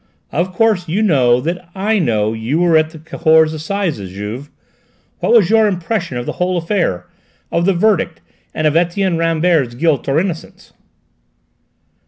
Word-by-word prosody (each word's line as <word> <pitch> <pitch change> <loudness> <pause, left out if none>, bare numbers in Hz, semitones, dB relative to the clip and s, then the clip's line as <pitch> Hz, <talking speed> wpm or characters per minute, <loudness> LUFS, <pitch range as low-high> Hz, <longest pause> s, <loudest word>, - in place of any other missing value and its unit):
"Of 175 +4 -1
course 200 -2 +1
you 190 +7 0
know 125 - +3
that 175 +4 -4
I 210 +3 0
know 110 - 0
you 115 +8 -2
were 175 -2 +3
at 155 0 +3
the 160 - -12
Cahors 160 0 +2
Assizes, 160 - -3
Juve? 105 +9 -7 0.7
What - - 0
was 215 -5 +5
your 220 -1 +5
impression 180 - -2
of 120 - -4
the - - -3
whole 180 0 +1
affair 165 - -1 0.5
of 170 +1 0
the 195 - +4
verdict, 185 -3 +1 0.3
and 155 - -3
of 155 0 +2
Etienne 175 +1 +1
Rambert's 165 -6 +1
guilt 145 -1 0
or 140 +3 +2
innocence?" 175 -2 -6
165 Hz, 160 wpm, -17 LUFS, 145-185 Hz, 0.7 s, was